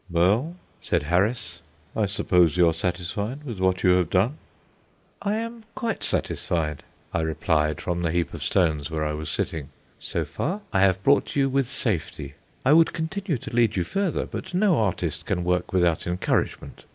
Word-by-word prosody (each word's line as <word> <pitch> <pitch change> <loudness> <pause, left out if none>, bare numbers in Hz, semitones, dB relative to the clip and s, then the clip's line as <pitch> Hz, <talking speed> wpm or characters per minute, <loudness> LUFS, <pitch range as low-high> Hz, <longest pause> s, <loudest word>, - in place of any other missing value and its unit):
"Well," 100 - +2 0.3
said 85 -4 0
Harris. 100 - 0 0.3
"I 105 -2 +1
suppose 90 -4 +2
you 90 -1 +6
are 80 - +3
satisfied 95 - -3
with 120 -9 -6
what 95 0 +1
you 90 - +6
have 90 -3 +3
done?" 105 +12 +1 0.8
"I 205 +1 0
am 230 0 -5
quite 235 -4 -2
satisfied," 75 -4 -1 0.3
I 85 - +1
replied 80 -1 0
from 85 -1 -2
the 85 - 0
heap 85 +1 -1
of - - -5
stones 80 -5 +1
where 80 -1 -2
I 75 - -1
was 75 0 -4
sitting. 70 -4 -2 0.3
"So - - -1
far, 190 +7 -3
I 95 - +3
have 95 0 +3
brought 140 +1 +3
you 135 -1 +3
with 135 -1 +1
safety. 80 - -2 0.3
I 135 - +6
would 165 +1 +5
continue 170 0 -2
to 115 - -7
lead 115 -3 +3
you 90 - +1
further, 190 - -1
but - - -6
no 185 - +3
artist 105 -5 -1
can 90 - 0
work 90 0 0
without 85 -4 +2
encouragement. 90 +1 -1
95 Hz, 175 wpm, -25 LUFS, 85-135 Hz, 0.8 s, you